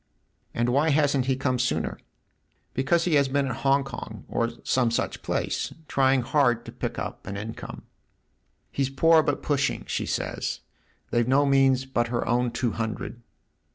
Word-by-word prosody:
" - - -43
And 120 +1 +1
why 145 +6 +3
hasn't 140 -3 +2
he 135 - +2
come 130 -1 0
sooner? 80 -11 -1 0.2
" - - -46
" - - -43
Because 155 +6 +2
he 175 - +1
has 140 -2 +4
been 140 +1 +1
at 125 -4 -3
Hong 140 0 +3
Kong, 120 -5 -8
or 115 0 0
some 125 -2 +2
such 115 - -2
place, - - -2
trying 135 -1 +3
hard 120 -3 +2
to - - -8
pick - - -4
up - - -6
an 100 - -4
income. 110 +2 -7 0.9
"He's 135 -1 0
'poor 160 +4 +5
but 145 -2 -1
pushing,' 140 -2 0
she - - -2
says. - - -2 0.5
They've 120 0 +2
no 140 +3 +4
means 135 -1 +3
but 120 -3 0
her 120 0 -2
own 120 +1 +2
two 120 0 -1
hundred." 115 +2 -4
130 Hz, 180 wpm, -26 LUFS, 120-140 Hz, 0.9 s, poor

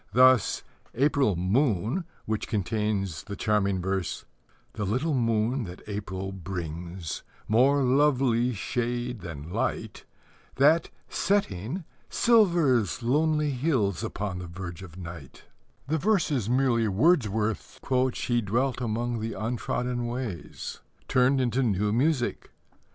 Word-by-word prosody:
Thus, 130 0 +5 0.3
April 135 -5 +3
Moon, 110 - +1 0.2
which 110 -1 -2
contains 100 -3 -1
the 100 - -5
charming 100 -2 +1
verse 95 -2 -2 0.5
"The 105 - -3
little 130 - 0
moon 115 0 +1
that 90 0 -9
April 95 -2 -4
brings, 85 -2 -5 0.3
More 135 +6 +4
lovely 130 -3 +3
shade 120 +2 -2
than 80 -3 -8
light, - - -2 0.5
That, 155 +5 +4 0.2
setting, 170 - -1 0.3
silvers 170 - +3
lonely 150 +3 +2
hills 125 - 0
Upon 100 -3 -3
the 90 - -6
verge 90 0 -7
of 90 -2 -11
night" 85 -6 -9 0.4
is 155 - +1
merely 125 -3 +2
Wordsworth's 110 - +1 0.3
"She 120 -1 0
dwelt 120 +5 0
among 120 +1 -1
the 110 +1 -3
untrodden 120 +3 -2
ways" 120 -8 -5 0.3
turned 130 +2 +3
into 125 0 +1
new 105 -3 +1
music. 130 0 0
115 Hz, 110 wpm, -27 LUFS, 95-130 Hz, 0.5 s, Thus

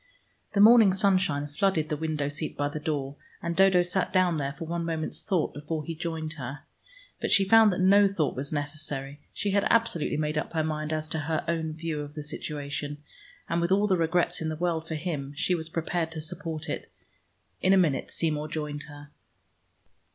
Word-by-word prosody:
The 200 - +1
morning 220 -2 +8
sunshine 185 -7 +2
flooded 155 +1 0
the 155 - 0
window 155 -2 -2
seat 145 +2 -4
by 145 0 0
the 150 - -5
door, 145 -2 -3 0.2
and 170 0 -3
Dodo 190 -1 +5
sat 180 +1 0
down 180 -3 +3
there 140 0 -2
for 165 - -5
one 170 +1 -2
moment's 165 -1 -3
thought 185 -7 0
before 150 +1 -4
he 165 - -4
joined 160 -1 -4
her. 135 +3 -6 0.6
But - - -1
she 195 - +5
found 220 +1 +7
that 180 - -2
no 200 +2 +6
thought 175 -7 -1
was 140 +2 -4
necessary. 145 -1 -4
She 205 - -2
had 200 0 +2
absolutely 230 -11 +2
made 150 0 0
up - - -5
her 160 -1 +1
mind 155 0 -2
as 155 0 -2
to 160 - -2
her 155 +1 -2
own 160 -1 -1
view 160 -1 -3
of 145 +1 -8
the 150 - -5
situation, 145 0 -5 0.4
and 170 0 0
with 170 +2 0
all 200 +2 +4
the 195 -3 +3
regrets 170 0 +1
in 160 - -1
the 155 - -3
world 165 -1 -1
for 160 - -3
him, 150 -4 -4
she 180 - +1
was 160 -2 -3
prepared 165 0 -2
to 160 - -5
support 160 -1 -5
it. - - -5 0.7
In 185 - +3
a 195 - +6
minute 160 -8 +2
Seymour 155 -2 -1
joined 150 -1 -4
her. 145 0 -12
160 Hz, 205 wpm, -27 LUFS, 150-180 Hz, 0.7 s, morning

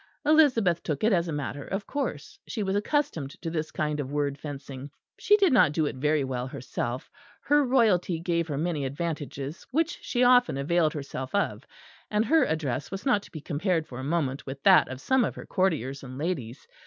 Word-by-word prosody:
Elizabeth 250 - +4
took 150 0 -3
it 220 0 +4
as 175 -1 +2
a - - -3
matter 145 -1 -4
of 195 +1 -4
course; 260 - -4
she 215 - -3
was 190 0 -1
accustomed 205 - -1
to 165 0 -4
this 160 -1 -2
kind 150 -1 -2
of 140 -1 -4
word 145 -1 0
fencing; 140 -1 -8 0.3
she 415 - +5
did 385 -8 +4
not 150 - +5
do 155 0 +1
it 145 - -3
very 150 +2 +1
well 130 -1 -3
herself: 125 -1 -5 0.3
her 290 +1 +4
royalty 215 -10 +2
gave 170 -1 0
her 145 -3 -3
many 160 -2 -1
advantages 145 0 -4
which 325 +4 0
she 245 0 0
often 245 - +5
availed 155 +2 +2
herself 135 0 -5
of; 200 - -1 0.4
and 210 +1 +1
her 320 +3 +4
address 145 -4 -2
was 195 +4 -6
not 245 -7 +3
to - - -15
be 155 - -7
compared 165 +2 -1
for 125 -4 -9
a - - -5
moment 140 -3 -1
with 135 +1 -7
that - - +7
of 130 0 -6
some 260 - +2
of - - -2
her - - -8
courtiers 150 - 0
and 130 -1 -9
ladies. 145 -6 -4
160 Hz, 205 wpm, -27 LUFS, 140-205 Hz, 0.4 s, that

